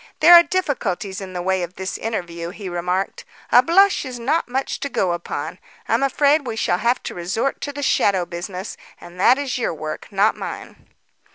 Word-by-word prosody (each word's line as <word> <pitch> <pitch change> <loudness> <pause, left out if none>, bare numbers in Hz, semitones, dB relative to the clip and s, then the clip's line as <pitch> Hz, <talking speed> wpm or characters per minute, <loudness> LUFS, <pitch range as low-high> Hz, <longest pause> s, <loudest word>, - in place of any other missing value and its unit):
"There 335 +3 +8
are 345 - +11
difficulties 240 - -2
in 190 -1 -8
the 180 -1 -4
way 190 0 +1
of 175 +1 -5
this 190 0 -4
interview," 170 -6 -4
he 200 +2 -8
remarked. 180 +2 -2 0.3
"A 245 - +8
blush 385 +8 +4
is 255 -3 -6
not 280 +8 0
much 265 +2 -2
to 280 - -3
go 185 -8 0
upon. 170 0 -5 0.3
I'm 230 +3 +1
afraid 285 +1 +2
we 225 - -3
shall 180 -5 0
have 235 +4 +1
to - - -5
resort 190 +10 -2
to 290 - -3
the 285 0 -6
shadow 195 -8 +2
business 180 +3 -6 0.2
and 175 +1 -13
that 245 +7 +5
is 275 -3 -2
your 230 - -1
work, 155 0 -6
not 200 +2 +2
mine." - - -8
205 Hz, 195 wpm, -21 LUFS, 180-275 Hz, 0.3 s, are